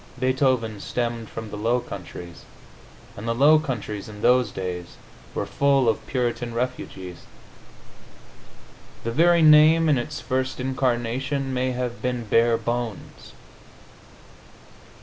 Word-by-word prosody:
Beethoven 130 -4 +1
stemmed 115 -1 -3
from 110 -2 -7
the 105 - -5
Low 115 +4 +1
Countries, 90 -5 -9 0.7
and 110 +1 -7
the 115 - 0
Low 150 +5 +6
Countries, 110 -8 -5
in 105 0 -10
those 125 -1 +4
days, 90 -3 -6 0.4
were - - -1
full 140 -2 +2
of 110 - 0
Puritan 120 -2 -2
refugees; 105 -8 -4 1.9
the 115 - -2
very 170 +5 +4
name, 155 +2 +7
in 145 -5 +3
its 145 +5 -5
first 130 0 -2
incarnation, 130 +1 -1
may 130 0 0
have 125 -1 -4
been 125 -2 -2
Barebones. 115 0 -1
120 Hz, 115 wpm, -24 LUFS, 115-130 Hz, 1.9 s, name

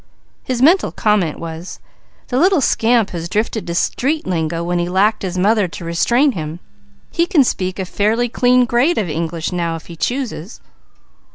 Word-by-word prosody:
His 255 -1 -1
mental 350 +7 +4
comment 205 -8 +1
was: 165 +2 -7 0.5
"The 250 - 0
little 370 +1 +4
scamp 230 -4 +2
has 170 -1 -5
drifted 215 +1 -2
to 170 - -3
street 290 - 0
lingo 165 -2 -2
when 175 0 -1
he 175 0 -1
lacked 200 +4 +2
his 185 -1 -4
mother 205 +1 +2
to 170 0 -9
restrain 235 - +2
him. 160 -5 -6 0.5
He 335 0 +1
can 330 -9 +4
speak 185 -6 -2
a 190 - -3
fairly 215 +6 0
clean 250 +1 +3
grade 245 +9 +2
of 205 - 0
English 165 +2 -3
now 170 -2 -2
if 165 - -9
he 170 - -10
chooses." 225 - -4
200 Hz, 175 wpm, -18 LUFS, 170-245 Hz, 0.5 s, mental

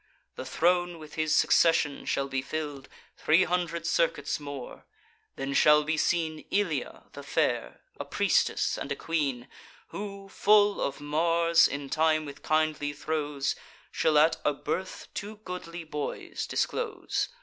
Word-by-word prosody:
The - - -6
throne 175 +5 +1
with 155 -1 -12
his 155 -1 +1
succession 155 -4 +3
shall 140 - 0
be 135 -1 -2
fill'd 145 -1 -5 0.3
Three 160 +4 +4
hundred 170 -2 -1
circuits 165 -4 0
more: 145 -3 -8 0.5
then 135 +1 -3
shall 150 +1 +6
be 155 +1 0
seen 160 -1 0
Ilia 170 -10 -1
the - - -8
fair, - - -1 0.2
a - - -2
priestess - - +1
and - - -5
a - - 0
queen, 140 -7 -2 0.4
Who, 200 -1 -7
full 205 +1 +4
of 140 - -2
Mars, 165 +3 +3
in 140 0 -5
time, 155 +1 +2
with 140 -1 -9
kindly 155 -2 0
throes, 145 -2 -2 0.4
Shall 155 -1 +2
at 155 +2 +5
a 150 - +2
birth 170 +6 -4
two 210 +2 -5
goodly 175 -2 -6
boys 150 -2 -5
disclose. 420 -7 -1
155 Hz, 140 wpm, -28 LUFS, 145-170 Hz, 0.5 s, shall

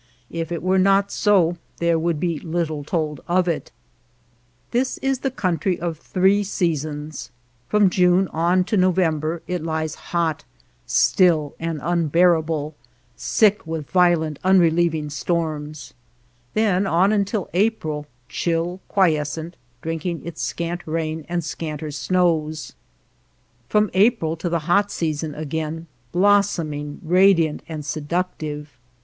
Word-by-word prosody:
If 165 0 -4
it 170 -1 -3
were 190 +1 +3
not 195 +1 +3
so 180 -5 +3 0.2
there 170 -1 +2
would 165 -1 0
be 170 -2 -1
little 160 -3 -2
told 150 -2 -2
of 180 +1 +2
it. 170 - -2 1.0
This 250 +2 0
is 270 -1 -1
the 270 - -1
country 185 - -1
of 165 -2 -3
three 195 +4 +2
seasoins^ 155 -5 -3 0.4
From 210 -1 +4
June 180 +1 +3
on 175 +3 +2
to 210 +3 -1
November 170 -3 +1
it 180 -2 -3
lies 160 -1 -2 0.2
hot, 165 -3 0 0.4
still, 160 -6 +3
and 165 -2 -3
unbearable, 165 -2 +2 0.4
sick 210 -5 +2
with 160 -3 -5
violent 170 -5 +3
unrelieving 170 -4 +3
storms; 155 -1 -3 0.6
then 200 -3 +2
on 190 +3 +3
until 200 -1 0
April, 165 -7 0 0.2
chill, 170 +5 -1
quiescent, 160 -2 0 0.3
drinking 165 +1 -3
its 170 -2 -6
scant 170 +1 -3
rain 160 -1 -3
and 175 -1 -1
scanter 155 -1 -5
snows; 160 -1 0 1.0
from 210 -1 +2
April 190 -5 +3
to 170 +2 -3
the 170 -1 0
hot 200 +4 +3
season 155 -2 -2
again, 155 +2 -4 0.3
blossoming, 175 -7 +1
radiant, 175 -2 +4
and 155 -2 -5
seductive. 150 -3 -4
170 Hz, 120 wpm, -22 LUFS, 155-185 Hz, 1.0 s, From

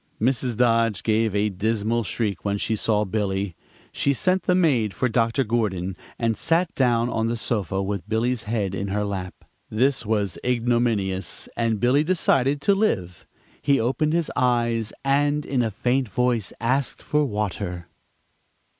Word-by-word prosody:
Mrs. 125 0 0
Dodge 115 -3 +2
gave 110 -1 +1
a 105 +1 +2
dismal 110 +3 0
shriek 105 -1 -2
when 100 0 0
she 110 +2 -1
saw 105 0 +1
Billy. 95 -2 -2 0.4
She 140 0 +1
sent 185 +6 +1
the 180 - +2
maid 125 - +2
for 125 - +1
Dr. 115 +2 +1
Gordon, 100 -6 -1 0.2
and 115 -1 0
sat 165 +6 +1
down 120 -3 +2
on 115 -2 -1
the 115 +1 -1
sofa 100 -4 -1
with 100 -1 -4
Billy's 115 +2 0
head 105 -4 -1
in 100 +1 -3
her 105 +1 -1
lap. 95 -3 -4 0.3
This 130 +4 +1
was 105 -2 -1
ignominious, 115 -7 0
and 115 -2 0
Billy 125 +6 +3
decided 145 -5 +2
to 200 - +4
live. 100 - -1 0.3
He 140 -1 +3
opened 135 +7 0
his 170 -1 0
eyes, 120 -3 +1
and 145 +2 +2
in 130 -3 0
a 115 - +1
faint 125 +4 0
voice 120 -1 0
asked 130 +3 -1
for 150 0 +1
water. 100 -7 -3
115 Hz, 155 wpm, -24 LUFS, 105-130 Hz, 0.4 s, to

